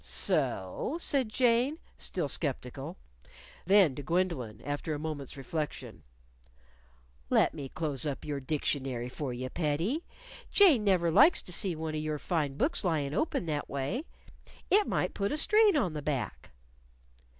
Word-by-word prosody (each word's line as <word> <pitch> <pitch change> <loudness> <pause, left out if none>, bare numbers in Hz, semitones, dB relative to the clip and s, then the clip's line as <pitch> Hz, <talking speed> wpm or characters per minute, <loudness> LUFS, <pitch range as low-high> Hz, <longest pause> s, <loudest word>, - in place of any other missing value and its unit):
"So?" 455 -9 -1
said 270 -8 +1
Jane, 245 +5 +2 0.2
still 175 -5 -1
sceptical. 140 +2 -3 0.7
Then 190 -7 +6
to 145 - -6
Gwendolyn, 145 - -1
after 145 +2 -2
a - - -5
moment's 150 -4 -5
reflection. 150 +3 -5 1.3
"Let - - +4
me 140 -4 -6
close 150 -5 -3
up 145 -3 -3
your 145 -2 -2
dictionary 130 -3 -2
for 135 +1 -4
you, 125 +1 -4
pettie. 175 - -1 0.5
Jane 330 - +6
never 180 -4 +3
likes 290 - +6
to 180 - -6
see 185 -2 0
one 160 0 -4
of 155 - -2
your 155 -1 -2
fine 150 -4 -1
books 300 - 0
lyin' 150 -6 0
open 245 - 0
that 150 -2 -3
way. 140 - -2 0.7
It 410 +1 +5
might - - 0
put 200 0 -1
a 300 - -1
strain 420 +1 +5
on 185 - +1
the 150 - -4
back." 135 -8 -3
155 Hz, 150 wpm, -30 LUFS, 140-210 Hz, 1.3 s, Then